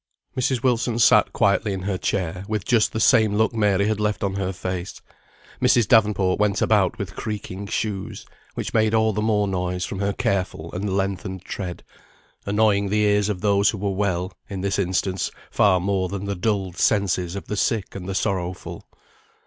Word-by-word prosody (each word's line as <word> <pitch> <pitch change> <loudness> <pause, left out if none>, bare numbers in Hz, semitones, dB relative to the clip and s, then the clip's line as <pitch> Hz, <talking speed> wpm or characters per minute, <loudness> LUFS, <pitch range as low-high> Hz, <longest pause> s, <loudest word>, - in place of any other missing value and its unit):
Mrs. 130 -1 0
Wilson 120 -2 +1
sat 115 - +5
quietly 100 +1 +1
in 95 -1 -5
her 100 0 -1
chair, 90 -1 -2
with 110 -3 -2
just 120 -4 +3
the 110 - -3
same 110 -2 +4
look 110 +2 +2
Mary 105 -2 +2
had 110 -1 0
left 105 -1 -1
on 100 -1 0
her 95 -1 -2
face; 90 -1 -5 0.6
Mrs. 120 -5 +4
Davenport 105 -4 +3
went 105 -2 +2
about - - +2
with - - -6
creaking 100 -2 -5
shoes, 100 -2 -3 0.3
which - - -4
made 110 0 +3
all 110 0 +3
the 105 - -1
more 105 -2 +1
noise 90 -1 -2
from 95 - -5
her 100 0 0
careful 90 -5 -2
and 95 +1 -2
lengthened 95 -1 -3
tread, 90 -4 -6 0.6
annoying 100 -1 +2
the 105 +2 +1
ears 105 0 +2
of 95 -4 -3
those 100 -1 +3
who 105 - -2
were 100 0 -1
well, 95 -1 -1 0.2
in 95 -2 -5
this 100 +1 -1
instance, 95 0 -1 0.2
far 95 -3 +4
more 95 0 -1
than 100 +1 -4
the 100 - -2
dulled 95 -2 -2
senses 95 -4 +1
of 100 - -6
the 105 - -4
sick 105 -1 -1
and 95 -1 -7
the 95 - -3
sorrowful. 95 -3 -3
100 Hz, 185 wpm, -23 LUFS, 95-105 Hz, 0.6 s, sat